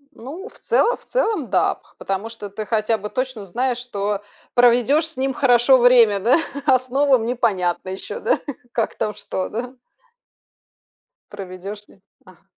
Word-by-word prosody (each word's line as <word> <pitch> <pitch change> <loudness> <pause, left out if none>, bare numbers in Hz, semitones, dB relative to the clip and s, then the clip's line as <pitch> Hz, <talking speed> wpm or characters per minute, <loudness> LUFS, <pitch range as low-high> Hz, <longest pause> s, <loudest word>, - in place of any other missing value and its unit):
Ну, 315 - -8
в - - -16
цело 485 - +2
в - - -23
целом, 440 - -1
да. - - +2
Пх - - -27
потому 195 +3 -3
что 220 -3 -8
ты 215 +2 -6
хотя 220 0 +1
бы 210 0 -6
точно 255 -3 -3
знаешь, 245 +6 -1
что 205 -4 -3 0.3
проведёшь 245 +5 +4
с 320 - -12
ним 265 +1 0
хорошо 250 0 +5
время, 240 -4 +5
да. 235 - +4 0.3
А 265 -3 +5
с 255 +1 -18
новым 265 -3 +3
непонятно 200 -8 -1
ещё, 190 +1 -6
да, - - +1 0.3
как 230 - -1
там 210 - -2
что, 185 - -4
да. 245 +4 -5 1.6
Проведёшь 200 +1 -8
ли? - - -21 0.3
Ага. 185 -2 -19
235 Hz, 160 wpm, -21 LUFS, 205-260 Hz, 1.6 s, хорошо